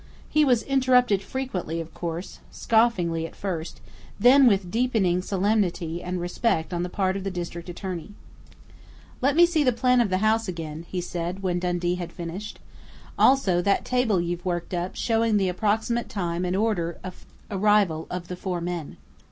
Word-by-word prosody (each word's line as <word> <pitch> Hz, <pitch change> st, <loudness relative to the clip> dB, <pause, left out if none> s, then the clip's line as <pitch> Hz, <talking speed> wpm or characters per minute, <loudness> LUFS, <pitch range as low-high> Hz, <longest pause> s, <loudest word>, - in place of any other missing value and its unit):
He 305 Hz, -, +3 dB
was 250 Hz, -5 st, +3 dB
interrupted 250 Hz, -6 st, +3 dB
frequently 195 Hz, -9 st, -4 dB
of 165 Hz, 0 st, -7 dB
course, 170 Hz, +1 st, -5 dB
scoffingly 180 Hz, -8 st, +1 dB
at -, -, -16 dB
first, 175 Hz, -5 st, -5 dB, 0.4 s
then 255 Hz, +4 st, +7 dB
with 195 Hz, -5 st, +2 dB
deepening 220 Hz, -7 st, +1 dB
solemnity 185 Hz, -4 st, 0 dB
and 180 Hz, 0 st, -3 dB
respect 175 Hz, 0 st, -1 dB
on 175 Hz, -, -1 dB
the 180 Hz, -, -2 dB
part 190 Hz, 0 st, 0 dB
of 195 Hz, -, -4 dB
the 195 Hz, -, -2 dB
district 175 Hz, -1 st, -6 dB
attorney. 180 Hz, +1 st, -6 dB, 1.1 s
"Let 275 Hz, +2 st, +2 dB
me 345 Hz, +1 st, +7 dB
see 335 Hz, -3 st, +1 dB
the 255 Hz, -, +4 dB
plan 250 Hz, +1 st, +3 dB
of 225 Hz, -, +1 dB
the 185 Hz, -, +1 dB
house 220 Hz, +2 st, +2 dB
again," 165 Hz, -2 st, -6 dB
he 180 Hz, -, -2 dB
said, 175 Hz, +2 st, -4 dB
when 180 Hz, -2 st, 0 dB
Dundee 175 Hz, 0 st, -1 dB
had 170 Hz, -1 st, -6 dB
finished. 180 Hz, +4 st, -7 dB, 0.6 s
"Also 195 Hz, -10 st, +4 dB
that 200 Hz, +2 st, +1 dB
table 250 Hz, -6 st, +1 dB
you've 175 Hz, 0 st, -3 dB
worked 175 Hz, -1 st, -3 dB
up 175 Hz, +1 st, -3 dB
showing 225 Hz, -2 st, +1 dB
the 190 Hz, -2 st, +1 dB
approximate 220 Hz, +5 st, 0 dB
time 175 Hz, -3 st, -2 dB
and 180 Hz, +1 st, -1 dB
order 190 Hz, -6 st, 0 dB
of 185 Hz, -1 st, -9 dB, 0.2 s
arrival 200 Hz, -5 st, +2 dB
of 180 Hz, -1 st, -5 dB
the 180 Hz, -, -5 dB
four 180 Hz, -1 st, -3 dB
men.... 170 Hz, -3 st, -5 dB
185 Hz, 170 wpm, -25 LUFS, 175-225 Hz, 1.1 s, then